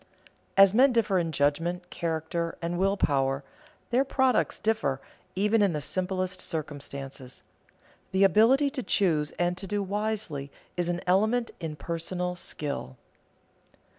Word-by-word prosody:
As 195 0 +8
men 260 +4 +6
differ 215 -5 +2
in 165 -2 -1
judgment, 165 +5 0
character, 165 0 -2
and 170 +1 -3
will 195 +1 +2
power, 135 -3 +1 0.5
their 250 +3 +4
products 265 -2 +1
differ, 215 -12 0 0.4
even 210 +3 +2
in 200 -4 +3
the 150 - -1
simplest 185 +3 -2
circumstances. 140 -4 -6 0.7
The 190 +1 +3
ability 235 - +5
to 275 -2 -3
choose 160 -10 +2
and 175 0 +1
to 195 - -6
do 205 +1 -1
wisely 200 -8 -2 0.3
is 175 -1 0
an 175 0 -1
element 220 +6 +2
in 160 -3 -4
personal 175 +3 -3
skill. 140 - -4
180 Hz, 135 wpm, -28 LUFS, 155-205 Hz, 0.7 s, As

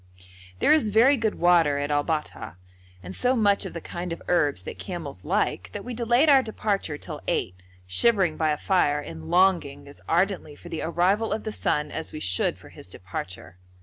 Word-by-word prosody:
There 95 - +4
is 300 -9 +3
very 235 +7 +5
good 225 -4 -1
water 170 -4 +3
at 145 +1 -2
Al 145 0 +2
Bat'ha, 150 - -4 0.5
and 95 +2 -8
so 250 +1 +2
much 205 -4 +2
of - - -10
the 170 - -5
kind 175 +2 -6
of 165 - -4
herbs 145 - +1
that - - -8
camels - - -7
like 90 -1 -1
that - - -6
we 250 - -5
delayed 240 +5 +2
our 275 -3 +7
departure 205 - -2
till - - -7
eight, 90 0 -2 0.2
shivering 185 - +3
by 155 -1 0
a 150 - 0
fire 150 -6 +1
and 80 - -8
longing 175 -7 +2
as 140 - -13
ardently 175 -3 0
for - - -12
the 165 - -4
arrival 185 +6 +1
of 215 - -2
the 215 - -4
sun 150 -6 -1
as 160 - -5
we 155 - -7
should 95 -8 0
for - - -15
his - - -11
departure. 90 -1 -8
170 Hz, 200 wpm, -25 LUFS, 145-215 Hz, 0.5 s, our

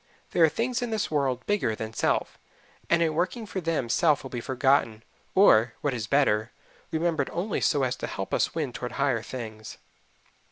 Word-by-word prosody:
There 170 - +3
are 160 - +7
things 235 - -1
in 245 - -2
this 220 -6 -2
world 135 -4 0
bigger 205 - 0
than 110 0 -6
self, - - -1 0.5
and 170 0 +4
in 160 -1 +1
working 185 +8 -1
for 195 -2 -4
them 165 -7 -1
self 145 +4 +2
will 135 - -8
be 120 - -4
forgotten, 130 -4 +1 0.3
or 120 - +5
what 145 -2 0
is 110 -3 -4
better 115 -5 +2 0.4
remembered 160 -3 0
only 180 +5 -2
so 145 -3 +2
as 130 0 0
to - - -4
help 95 - -5
us - - +1
win 150 -7 -2
toward 125 0 -5
higher 135 -5 +1
things. 110 -3 -8
140 Hz, 190 wpm, -27 LUFS, 120-170 Hz, 0.5 s, are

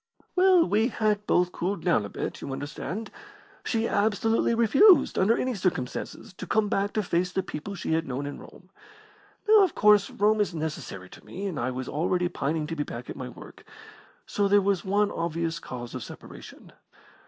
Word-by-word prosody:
"Well, 365 -2 +5
we 220 +3 +2
had 210 -4 -1
both 180 0 +2
cooled 185 0 -3
down 160 - +2
a - - -7
bit, - - -5
you 140 - -6
understand. 145 +9 -5 0.5
She 230 -1 0
absolutely 220 +2 +1
refused, 275 - +5
under 215 +5 +3
any 255 0 -1
circumstances, 185 - -3
to - - -7
come 215 -1 +1
back 200 +1 0
to 215 - 0
face 180 0 0
the 190 0 -1
people 185 +3 -6
she 175 - -3
had 160 0 0
known 135 +2 -3
in 145 - -6
Rome. - - -15 0.8
Now, 430 -1 +7
of 375 -4 +2
course, 210 -1 +5
Rome 210 +1 +2
is 195 -4 -1
necessary 150 - -5
to - - -14
me, 195 +3 -7
and 185 -6 -3
I 120 - -1
was 130 0 -5
already 175 +4 0
pining 155 +1 -2
to 165 +2 -5
be 150 - -1
back 120 -3 -8
at - - -8
my 130 -2 -6
work - - -13 0.6
so 205 -1 0
there 205 +1 +5
was 195 -2 0
one 205 +1 +1
obvious 165 0 -2
cause 120 -2 -8
of 130 -2 -5
separation. - - -12
190 Hz, 190 wpm, -26 LUFS, 155-210 Hz, 0.8 s, Now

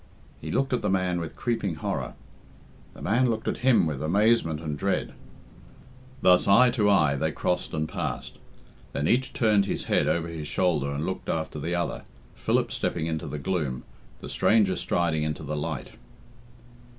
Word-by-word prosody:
He - - -6
looked 135 -1 0
at 125 - +1
the 105 - 0
man 95 -2 +1
with 80 - -6
creeping 115 -8 -1
horror. 75 - -3 0.8
The - - -11
man 125 +4 +2
looked 115 - -2
at - - 0
him 125 -7 +4
with 75 -4 -3
amazement 90 -1 +2
and 75 -2 -4
dread. - - -1 1.1
Thus, 90 -1 +5
eye 125 +6 +6
to 110 -4 +2
eye, 75 -8 +4
they 80 +3 0
crossed 90 +5 -1
and 80 0 -1
passed. - - -5 0.5
Then 70 +2 -1
each 130 +2 +2
turned 105 -4 +3
his - - -2
head - - +1
over 85 0 0
his 80 -3 -6
shoulder 80 -6 +1
and 70 +2 -2
looked 95 - -4
after 80 -1 -2
the 85 +4 -2
other, 85 0 -2 0.3
Philip - - 0
stepping 80 - -1
into 80 -1 -3
the 75 - -4
gloom, 75 -5 -2 0.4
the - - -7
stranger 105 -4 +3
striding 85 -3 0
into 75 0 -3
the 75 +1 -3
light. 75 - -4
85 Hz, 175 wpm, -26 LUFS, 75-105 Hz, 1.1 s, eye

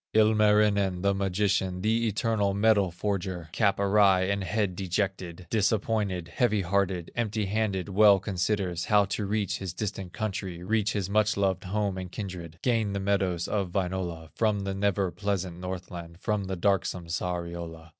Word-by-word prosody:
Ilmarinen, 105 -3 +3
the 100 0 +3
magician, 95 -1 0
The 115 +2 +2
eternal 105 -2 0
metal 100 -2 +3
forger, 90 -2 -3
Cap 100 +1 +2
awry 100 -2 +4
and 100 +1 0
head 100 -1 -1
dejected, 95 -1 -3
Disappointed, 105 -4 0
heavy 105 +4 +1
hearted, 95 -1 0
Empty 110 -3 -1
handed, 100 -2 -1
well 100 0 +6
considers, 95 -2 -1
How 105 -1 +4
to 100 +1 -3
reach 100 -1 -1
his 95 -3 -5
distant 95 -3 -4
country, 95 -4 -4
Reach 105 +1 +1
his 100 -4 -1
much 105 +1 +2
loved 95 -1 0
home 100 0 -1
and 90 -1 -7
kinded, 90 -6 -6
Gain 115 -5 +1
the 100 - -1
meadows 95 -3 0
of 95 -4 -2
Wainola, 90 -4 -2
From 105 -3 +1
the 100 0 -3
never 100 -1 0
pleasant 95 -4 -3
Northland, 90 -2 -7
From 105 0 -1
the 95 0 -3
darksome 95 -2 0
Sariola. 85 -1 -4
100 Hz, 155 wpm, -28 LUFS, 90-105 Hz, -, well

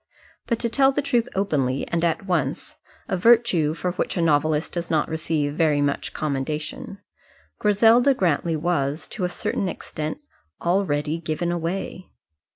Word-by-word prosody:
But 235 - +1
to 235 - +1
tell 270 +3 +4
the 280 - -1
truth 240 -4 +1
openly 140 -9 0
and 170 0 -1
at 170 +3 0
once 175 -6 -2 0.3
a - - 0
virtue 185 -7 +4
for 180 +1 -2
which 180 - -2
a - - +1
novelist 155 0 +2
does 170 -1 -4
not 155 -2 +1
receive 155 -2 -1
very 155 -2 +2
much 145 0 -1
commendation 150 +5 -4 0.6
Griselda 225 +6 +5
Grantly 170 -4 +1
was, 150 -2 -1
to 185 - -3
a - - -1
certain 185 +1 -2
extent, 155 -2 -5 0.4
already 165 -4 0
given 165 +2 -2
away. 175 +2 -4
170 Hz, 150 wpm, -23 LUFS, 150-195 Hz, 0.6 s, Griselda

